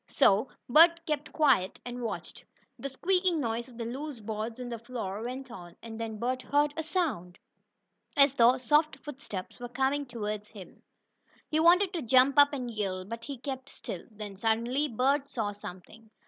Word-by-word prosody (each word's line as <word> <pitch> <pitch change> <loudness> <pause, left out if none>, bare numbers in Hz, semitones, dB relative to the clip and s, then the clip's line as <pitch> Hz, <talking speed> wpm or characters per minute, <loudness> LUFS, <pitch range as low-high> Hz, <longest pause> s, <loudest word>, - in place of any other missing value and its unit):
So 205 +6 +4 0.2
Bert 335 +5 +6
kept 300 -1 -2
quiet 265 - +2
and 245 0 -5
watched. 230 - -5 0.4
The 275 - -4
squeaking 360 +4 +1
noise 235 -1 -2
of 240 - -15
the 230 - -4
loose 270 +2 -5
boards 220 +2 -4
in 250 - -5
the 235 -1 -5
floor 225 -4 -5
went 255 +2 -6
on, 175 -6 -10
and 225 -1 -8
then 225 -1 -4
Bert 255 +3 -1
heard 290 +3 +2
a 325 - -2
sound, 310 - -2 0.8
as 280 -1 +6
though 245 0 +5
soft 300 +5 +2
footsteps 260 -11 -7
were 245 0 -6
coming 270 +3 0
toward 210 -3 -4
him. 200 -5 -13 0.7
He 310 - +1
wanted 355 +4 +5
to 340 - -2
jump 260 +3 +5
up 285 0 +7
and 250 -4 -4
yell, 190 -4 -3
but 230 +3 -7
he 280 -2 -6
kept 265 +1 -6
still. 175 - -7
Then, 210 -3 -8
suddenly, 235 +7 +1
Bert 275 +3 +1
saw 220 -6 -2
something. 205 +2 -11
245 Hz, 175 wpm, -29 LUFS, 220-285 Hz, 0.8 s, up